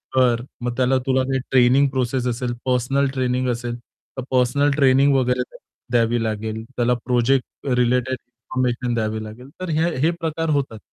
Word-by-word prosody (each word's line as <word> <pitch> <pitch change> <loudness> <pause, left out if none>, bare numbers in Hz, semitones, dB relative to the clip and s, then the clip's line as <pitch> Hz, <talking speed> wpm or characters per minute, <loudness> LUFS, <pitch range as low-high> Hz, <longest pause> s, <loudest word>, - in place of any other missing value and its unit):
कर 120 -2 +3 0.2
मग 120 0 -2
त्याला 130 +1 +3
तुला 130 0 +2
काही 135 0 -1
ट्रेनिंग 130 +2 +5
प्रोसेस 125 -1 -1
असेल, 120 0 -2
पर्सनल 130 +2 +1
ट्रेनिंग 130 -1 0
असेल, 120 0 -3
तर 125 +2 -12
पर्सनल 130 +3 +2
ट्रेनिंग 135 0 +4
वगैरे 125 -1 +1 0.5
द्यावी 115 -1 +2
लागेल. 110 0 -3
त्याला 125 -1 0
प्रोजेक्ट 125 +2 0
रिलेटेड 125 +1 +1
इन्फॉर्मेशन 120 0 -3
द्यावी 110 -1 -2
लागेल 120 +5 -10
तर 185 - -4
ह्या 165 - +3
हे 160 +4 +3
प्रकार 165 0 -2
होतात. 115 -5 -6
125 Hz, 155 wpm, -22 LUFS, 120-130 Hz, 0.5 s, ट्रेनिंग